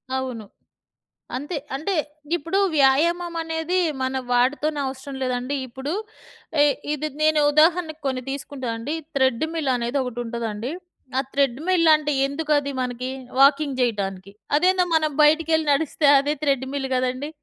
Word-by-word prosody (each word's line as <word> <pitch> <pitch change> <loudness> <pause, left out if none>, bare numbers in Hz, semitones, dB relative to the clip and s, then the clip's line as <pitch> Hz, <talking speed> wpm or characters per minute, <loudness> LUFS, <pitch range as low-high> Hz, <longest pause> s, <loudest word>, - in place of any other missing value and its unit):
అవును. 255 -5 -4 0.9
అంతే. 295 +4 -4 0.2
అంటే 315 +9 -2 0.4
ఇప్పుడు 335 +5 -1 0.2
వ్యాయామమనేది 325 +4 +1 0.2
మన 260 0 -1
వాటితోనే 290 +5 +1
అవసరం 265 +1 -7
లేదండి. 255 +2 -2
ఇప్పుడు 265 +5 -5 0.7
ఎ - - +6 0.3
ఇది 300 +1 -2 0.2
నేను 310 0 +4
ఉదాహరణకు 315 +1 +3
కొన్ని 260 -1 -2
తీసుకుంటానండి. 260 -2 -4 0.2
థ్రెడ్డుమిల్ 275 +3 +1
అనేది 240 +3 -1
ఒకటుంటదండి. 235 -1 -4 0.5
ఆ - - +3
థ్రెడ్‌మిల్లంటే 305 +3 +3
ఎందుకది 290 -1 0
మనకి, 250 0 -3 0.3
వాకింగ్ 280 -1 +4
జెయ్యటానికి. 200 -5 -2 0.3
అదేందో 365 +2 +3
మనం 310 -1 +2
బయటికెళ్ళి 315 +1 +3
నడిస్తే 300 0 +1
అదే 290 +2 0
థ్రెడ్‌మిల్ 275 -1 -1
గదండీ. 255 +3 -1
280 Hz, 110 wpm, -23 LUFS, 255-315 Hz, 0.9 s, ఎ